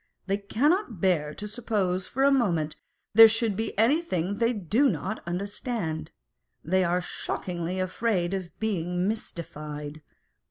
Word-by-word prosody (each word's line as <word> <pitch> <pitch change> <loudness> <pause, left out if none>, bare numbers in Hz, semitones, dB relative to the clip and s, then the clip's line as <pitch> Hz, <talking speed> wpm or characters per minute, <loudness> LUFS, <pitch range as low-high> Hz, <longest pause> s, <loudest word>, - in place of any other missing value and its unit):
They 195 +1 0
cannot 240 - +1
bear 160 -5 +1
to 210 - -5
suppose 205 -5 -1
for 270 - -1
a 280 - +6
moment 170 - +1 0.4
there 225 +1 +11
should 225 -1 +1
be 220 0 -3
anything 215 - +1
they 230 0 +3
do 220 - +2
not 190 - -3
understand: 195 - -3 0.5
they 185 +4 +2
are 180 +1 +1
shockingly 175 0 -3
afraid 185 -1 0
of 185 -3 -3
being 180 -4 -1
mystified. 150 -7 -5
195 Hz, 130 wpm, -27 LUFS, 175-225 Hz, 0.5 s, there